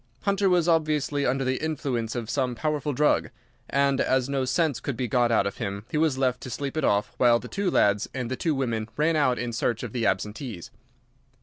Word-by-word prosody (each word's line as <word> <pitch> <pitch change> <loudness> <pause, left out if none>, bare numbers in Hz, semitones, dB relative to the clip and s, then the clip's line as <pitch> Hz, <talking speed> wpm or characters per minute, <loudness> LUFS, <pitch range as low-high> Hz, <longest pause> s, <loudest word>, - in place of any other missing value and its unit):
Hunter 200 -1 +2
was 175 -2 +3
obviously 150 -3 +1
under 135 +2 0
the 130 +3 -1
influence 130 -7 -2
of 120 -2 -3
some 130 0 -1
powerful 150 +3 -1
drug, 150 +3 +2 0.4
and 140 0 +2
as 130 -1 +1
no 135 -1 -1
sense 145 0 +1
could 135 -5 -4
be 125 - -1
got 120 +1 +2
out 115 - +3
of 100 - -3
him, 100 -2 -4
he - - -1
was 155 -4 +2
left 125 -2 0
to - - -7
sleep 135 +4 -4
it 155 - -1
off 105 -2 +1
while 120 -2 +5
the - - -8
two 200 -1 -1
lads 100 - +2
and 125 -2 -4
the - - 0
two 155 +3 0
women 115 -5 -2
ran 155 +2 +2
out 130 -5 +2
in 120 -1 -3
search 115 0 -1
of 120 - -6
the 120 -3 0
absentees. 105 - -3
130 Hz, 220 wpm, -26 LUFS, 120-150 Hz, 0.4 s, while